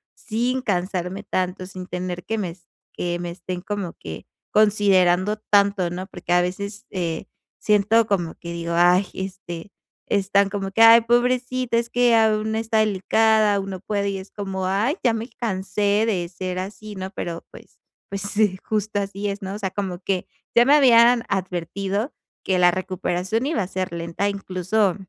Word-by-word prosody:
sin 245 +3 -1
cansarme 185 -1 -2
tanto, 185 -1 -2
sin 185 -1 -8
temer 180 -1 -4
que 225 - -2
me 190 -5 -2
es 170 -1 -17 0.3
que 175 0 -2
me 175 0 -4
estén 180 0 -6
como 200 -4 -4
que 80 - -9 0.3
considerando 200 -2 +3
tanto, 200 -3 +2
¿no? 185 +1 -5
Porque, 175 -3 -3
a 175 - +5
veces, 200 +5 -4
eh, 170 -4 -3 0.3
siento 210 +2 +3
como 175 -6 -1
que 170 - -8
digo: 170 0 -3
"Ay", 180 +3 +4
este, 190 -1 -7 0.4
están 200 0 +2
como 195 -1 -4
que: 225 +4 +1
"Ay, 230 +1 +9
pobrecita, 250 +1 +1
es 235 0 -1
que 245 -1 +3
aún 220 -1 +2
está 225 0 0
delicada, 215 +1 +3
aún 195 0 -3
no 185 - -5
puede", 200 -1 -1
y 195 - -3
es 190 - -11
como, 190 -2 -3
ay, 215 - +1
ya 240 -3 +3
me 225 +1 -3
cansé 205 0 0
de 180 -6 -1
ser 185 0 -4
así, 210 +2 -7
¿no? 190 0 -5
Pero, 170 -3 -5
pues - - -16 0.3
pues, 200 0 -4 0.4
justo 215 -1 -1
así 200 +1 -4
es, 200 +1 -5
¿no? 195 +1 -5
O - - -6
sea, 190 -3 -2
como 190 -3 -3
que 190 -1 -2 0.3
ya 240 - +7
me 285 +3 +6
habían 240 -3 +6
advertido 195 - -2 0.3
que 185 -1 +1
la 175 0 +6
recuperación 185 +4 -2
iba 310 -9 0
a 180 - -5
ser 185 -2 -3
lenta, 170 +4 -2
incluso 190 0 0
195 Hz, 175 wpm, -23 LUFS, 185-215 Hz, 0.4 s, Ay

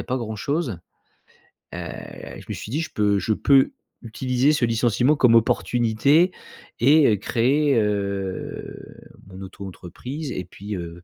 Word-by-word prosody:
a - - -6
pas 130 - -2
grand 110 -2 -5
chose. 140 - -2 1.0
Heu, - - -5 0.6
je - - -15
me - - -2
suis - - -7
dit: 150 +5 0
«Je 160 - -5
peux 105 -1 +2
je 110 - 0
peux 135 +4 +4 0.3
utiliser 125 +4 +1
ce 130 - +2
licenciement 120 +4 +2
comme 125 -5 +5
opportunité 120 +9 +3 0.5
et 135 -4 +5
créer, 135 +7 +2
heu, 100 -2 -3 0.5
mon 95 0 -11
auto-entreprise 100 - -7
et 95 - -4
puis, 105 +2 -7
heu, 85 -1 -8
115 Hz, 140 wpm, -23 LUFS, 100-135 Hz, 1.0 s, comme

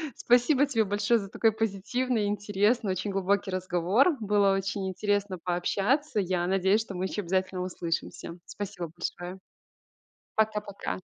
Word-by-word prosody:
Спасибо 250 +4 +4
тебе 225 -6 +1
большое 205 +4 +2
за 195 -2 -7
такой 225 +1 +2
позитивный 225 +3 -1
и - - 0
интересный, 205 +1 +1
очень 185 +2 -2
глубокий 195 0 0
разговор. 185 - +2
Было 205 -2 +3
очень 195 0 -2
интересно 205 0 -1
пообщаться. 200 - 0
Я 180 -2 0
надеюсь, 195 +3 +3
что 200 -4 -7
мы 185 +1 -2
ещё 205 +2 -2
обязательно 185 0 -1
услышимся. 170 -1 -4
Спасибо 195 -5 -6
большое. 175 +2 -5 1.0
Пока-пока! 210 -2 -1
200 Hz, 135 wpm, -28 LUFS, 185-215 Hz, 1.0 s, Спасибо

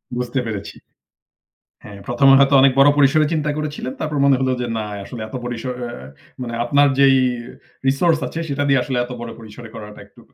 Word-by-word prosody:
বুঝতে 125 +1 -2
পেরেছি। 105 -4 -6 1.1
হ্যাঁ 105 - -11
১ম 120 +3 +2
এ - - +8
হয়তো 140 0 +4
অনেক 135 0 +5
বড় 140 +1 +7
পরিসরে 145 +2 +4
চিন্তা 150 -1 -1
করেছিলেন। 150 -4 -4
তারপর 155 -1 -3
মনে 140 -1 +5
হলো 130 -1 0
যে - - -2
না - - -2 0.2
আসলে 115 +3 -9
এত 110 - -9
পরিসর 120 +1 -4
এ - - -4 0.5
মানে 120 -2 -5
আপনার 140 +4 +4
যেই 135 -1 +6 0.7
রিসোর্স 155 +4 +2
আছে 165 - -6
সেটা 140 0 -1
দিয়ে 135 -1 +4
আসলে 130 0 -3
এত 120 - -8
বড় 120 0 -6
পরিসরে 115 +1 -11
করাটা 105 -1 -10
একটু - - -22
135 Hz, 190 wpm, -20 LUFS, 120-145 Hz, 1.1 s, এ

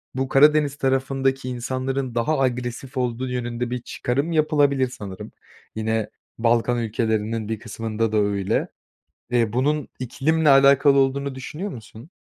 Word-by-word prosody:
bu 130 0 -1
Karadeniz 145 +1 +4
tarafındaki 135 -1 0
insanların 130 +1 -3
daha 135 +6 +1
agresif 125 +1 -2
olduğu 125 0 -1
yönünde 120 -1 -3
bir 125 0 -3
çıkarım 140 +6 -2
yapılabilir 145 -4 +2
sanırım. 100 -6 -8 0.4
Yine 110 0 -1 0.3
Balkan 120 +1 +2
ülkelerinin 110 -1 -1
bir 110 - -3
kısmında 115 0 -3
da 110 - +1
öyle. 100 -2 0 0.6
Eee, 115 -3 +1
bunun 145 +4 0
iklimle 150 +6 0
alakalı 140 0 +6
olduğunu 135 0 +1
düşünüyor 150 +9 -6
musun? 115 +5 -12
125 Hz, 125 wpm, -23 LUFS, 115-140 Hz, 0.6 s, alakalı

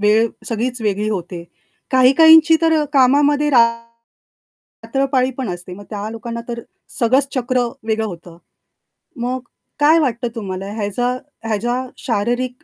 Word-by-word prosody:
वेळ 215 +2 +3 0.2
सगळीच 245 +2 -2
वेगळी 210 0 -1
होते. 175 -3 -5 0.5
काही-काहींची 320 +5 +6
तर 320 -2 +3
कामामध्ये 285 +2 +3 1.1
रात्रपाळी 265 +2 -1
पण 255 -6 -3
असते. 180 0 -7
मग 205 +1 -12
त्या 210 -1 -4
लोकांना 235 +1 -6
तर 235 0 -4 0.4
सगळंच 260 +4 +2
चक्र 250 -1 0
वेगळं 220 0 -1
होतं. 170 -3 -10 0.8
मग 250 +2 -2 0.4
काय 310 +3 +5
वाटतं 245 -4 -1
तुम्हाला 195 -2 -5
ह्याचा 220 +3 -1 0.4
ह्याचा 240 +4 -1
शारीरिक 245 +3 -2
240 Hz, 120 wpm, -18 LUFS, 210-265 Hz, 1.1 s, काही-काहींची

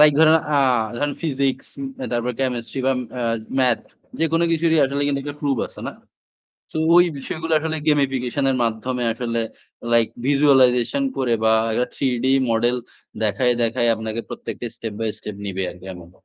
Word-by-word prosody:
Like 150 -1 +8
ধরেন 160 0 +7 0.2
আ - - +5 0.6
physics, 140 -4 -1 0.5
তারপর 120 +1 0
chemistry 125 0 -2
বা 135 - +4 0.3
আ - - -1 0.4
মাথস 125 -3 +1 0.3
যেকোনো 165 +1 +2
কিছুরই 165 0 +2
আসলে 140 +1 -1
কিন্তু 140 -1 0
একটা 145 +1 -7
প্রুফ 140 -5 0
আছে - - -13
না? - - -4 0.8
তো - - -7 0.2
ওই 175 - +8
বিষয়গুলো 160 +4 -4
আসলে 160 0 -2
গেমিফিকেশন 135 -2 +1
এর 130 - +1
মাধ্যমে 120 +2 -2
আসলে 115 0 -2 0.5
লাইক 115 -1 +5 0.2
ভিজুয়ালাইজেশন 140 - +4
করে 125 -3 +1
বা 110 0 +5 0.4
থ্রি 135 - -1 0.2
ডি 135 - +4 0.2
মডেল 120 +2 +2 0.5
দেখায়ে 125 +3 +2
দেখায় 115 +1 +1
আপনাকে 110 +1 -4
প্রত্যেকটা 120 - -6
স্টেপ 115 -2 -5
বাই 110 -1 0
স্টেপ 105 -2 -7
নিবে 95 -1 -3
আরকি 90 +1 -13
এমন। 85 -1 -12
130 Hz, 155 wpm, -22 LUFS, 115-145 Hz, 0.8 s, লাইক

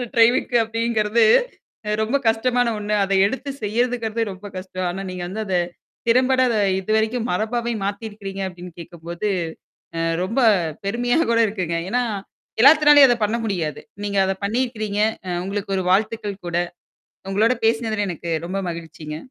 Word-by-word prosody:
ட்ரைவிக்கு, 240 +1 +4
அப்டிங்கிறது 230 0 +1 0.8
ரொம்ப 225 +6 0
கஷ்டமான 245 +2 +1
ஒண்ணு. 210 0 -1
அத 195 - -1
எடுத்து 270 +5 -5
செய்யறதுங்கறதே 230 +1 0
ரொம்ப 190 +2 -9
கஷ்டம். 185 0 -5
ஆனா 190 +2 -4
நீங்க 180 -1 -5
வந்து 210 +4 -4
அத 190 -2 -1 0.5
திறம்பட 255 +2 +4 0.4
இதுவரைக்கும் 220 +4 0
மரபாவே 235 +5 -1
மாத்திருக்கிறீங்க 200 -1 -5
அப்டின்னு 180 -1 -10
கேட்கும்போது. 170 +3 -5 0.7
அ - - -1 0.2
ரொம்ப 230 +8 -1 0.4
பெருமையா 245 +7 +1
கூட 230 - +3
இருக்குங்க. 185 -5 -2
ஏன்னா, 250 +1 +1 0.6
எல்லாத்துனாளையும் 295 -1 +8
அத 245 - +3
பண்ண 220 +3 0
முடியாது. 175 -8 -2 0.2
நீங்க 200 -1 -2
அத 190 - +1
பண்ணிருக்கிறீங்க. 215 -2 -1 0.3
அ - - -3
உங்களுக்கு 195 0 -3
ஒரு 185 - -2
வாழ்த்துக்கள் 205 0 0
கூட. 170 - -2 0.7
உங்களோட 220 +5 +3
பேசினதுல 225 -2 0
எனக்கு 170 0 -6 0.2
ரொம்ப 195 +2 -3
மகிழ்ச்சிங்க. 160 -2 -7
215 Hz, 135 wpm, -22 LUFS, 190-235 Hz, 0.8 s, எல்லாத்துனாளையும்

